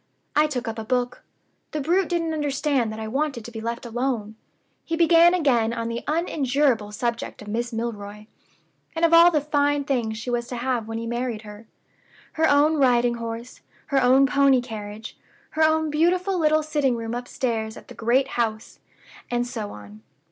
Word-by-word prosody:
I 300 +1 +4
took 255 -5 -4
up 225 0 -4
a - - -4
book. 245 +2 -1 0.5
The 305 - -1
brute 345 +6 +1
didn't 335 -2 -1
understand 280 -5 0
that 220 - -7
I 220 - -4
wanted 270 -1 -2
to 240 - -8
be 225 -1 -7
left 235 +2 -4
alone; 235 -3 -2 0.5
he 330 - -2
began 340 +1 +5
again 240 -9 +2
on 230 -1 -3
the 235 0 -4
unendurable 280 -8 +1
subject 235 0 -3
of - - -13
Miss 235 +3 -2
Milroy, 210 -2 -5 0.7
and 330 +1 +2
of 335 - +2
all 335 +1 +9
the 315 -3 +1
fine 290 -1 +1
things 240 -6 -1
she 240 +2 -5
was 240 0 -1
to 250 - -5
have 240 -2 -2
when 225 0 -4
he 230 - -4
married 235 -2 -3
her. 210 +1 -12 0.7
Her 320 0 +2
own 295 +2 +4
riding 245 -3 +3
horse; 230 +2 -7 0.3
her 270 - +4
own 260 +2 +5
pony 275 -1 +4
carriage; 220 -3 -8 0.3
her 315 - -2
own 315 0 +3
beautiful 360 +5 +1
little 310 -1 +3
sitting 295 -5 0
room 230 0 -4
upstairs 235 -2 -3
at - - -13
the - - -11
great 250 +4 +1
house, 225 -1 -3 0.5
and 240 0 0
so 230 -4 -5
on. 105 +1 -12
245 Hz, 185 wpm, -24 LUFS, 225-295 Hz, 0.7 s, all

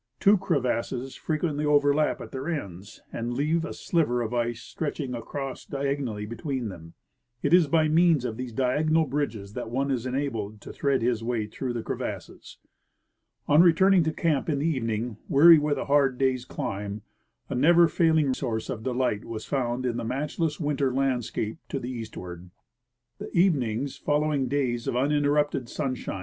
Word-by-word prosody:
Two 200 +1 +6
crevasses 130 - -1
frequently 155 -2 -2
overlap 145 0 +3
at - - -9
their 135 +4 -4
ends 100 - -6
and 120 +1 -3
leave 155 +5 +1
a - - -5
sliver 125 -8 0
of 115 +1 -4
ice 120 -1 -1
stretching 145 0 -4
across 130 +3 -5
diagonally 135 -6 -3
between 125 +1 -4
them. 85 -3 -11 0.5
It 145 - +2
is 175 -3 +6
by 155 +1 +3
means 160 -4 +3
of 115 -3 -3
these 125 +1 -5
diagonal 150 +7 +2
bridges 125 -8 -3
that 115 - -5
one 135 +3 -1
is 125 -1 -1
enabled 115 -6 -3
to - - -9
thread 140 -4 0
his 115 -2 0
way 115 -2 -1
through 120 +4 -4
the 115 -2 -4
crevasses. - - -6 0.9
On 150 +3 +6
returning 180 +2 +5
to 160 - +1
camp 155 -3 0
in 145 - +1
the 140 - -1
evening, 115 -6 -1
weary 160 +3 +8
with 145 0 0
a - - -3
hard 140 -2 +3
day's 130 -2 +1
climb, 100 -2 -5 0.4
a - - -4
never 170 +6 +5
failing 160 -5 +2
source 115 -4 -3
of 110 - -5
delight 125 -3 -1
was 110 -2 -6
found 130 -2 -1
in 120 -2 -1
the - - -3
match 135 +8 -3
less 160 -3 0
winter 145 -4 0
landscape 125 -4 -1
to - - -2
the 125 0 -5
eastward. 90 -7 -8 0.7
The - - -6
evenings 140 - +1
following 145 -2 0
days 125 -3 -1
of - - -1
uninterrupted 145 0 +1
sunshii:i. 130 -8 -3
135 Hz, 170 wpm, -26 LUFS, 120-150 Hz, 0.9 s, weary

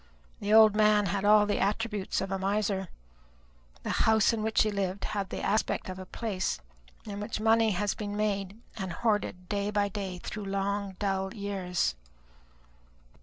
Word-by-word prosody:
The 205 - -2
old 220 -1 +7
man 210 -1 +4
had 195 +2 -1
all 210 0 +6
the 205 - 0
attributes 210 -1 -1
of 195 0 -4
a 195 - -1
miser. 195 -1 0 1.0
The - - -2 0.2
house 220 0 +4
in 225 - -1
which 220 0 +3
he 215 - 0
lived 195 -1 -2
had 200 -3 -3
the - - -5
aspect 215 -2 0
of 185 0 -6
a 185 - -8
place 200 -4 -2 0.5
in 205 -2 -6
which 210 +1 -4
money 225 +1 +4
has 205 +2 0
been 205 -1 -5
made 200 -1 -1 0.2
and 190 -4 -3
hoarded 205 -3 -1
day 200 0 -1
by 205 -1 +1
day 195 -2 -4
through 205 +3 -6
long 195 0 -2
dull 195 +1 -1
years. 190 - -1
205 Hz, 170 wpm, -29 LUFS, 195-215 Hz, 1.0 s, old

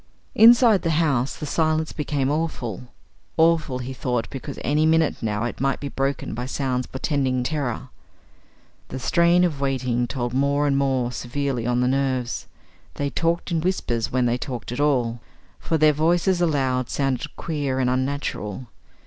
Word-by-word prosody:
Inside 230 -2 +7
the 165 - -1
house 140 -6 +1
the - - -6
silence 155 +1 0
became 145 -2 -1
awful; 130 - -3 0.5
awful, 160 -5 +3
he 130 +1 -5
thought, 125 -2 -2
because 135 +1 -7
any 150 +2 +2
minute 160 0 +2
now 105 -1 -1
it 120 +1 -4
might 135 0 +1
be 140 - -5
broken 135 0 -2
by 125 +2 -4
sounds 130 -2 -2
portending 130 -2 -1
terror. 130 -3 -3 1.0
The 130 - -6
strain 170 +6 +3
of 155 -6 -1
waiting 125 -3 0
told 120 -1 -3
more 140 +2 +2
and 140 -1 +2
more 130 -3 +1
severely 125 -1 -3
on 125 0 +1
the 125 - +2
nerves; 130 -2 -1 0.5
they 140 -1 -2
talked 170 +4 -1
in 165 -2 +1
whispers 125 -10 -1
when 125 -1 +1
they 120 +1 +1
talked 125 -5 -5
at 125 - -4
all, 125 -5 +1 0.4
for 160 - 0
their 155 0 +5
voices 175 +4 +2
aloud 130 -6 +1
sounded 135 -3 -2
queer 145 -5 -2
and 130 -1 +1
unnatural. 130 -4 -2
135 Hz, 160 wpm, -23 LUFS, 125-155 Hz, 1.0 s, Inside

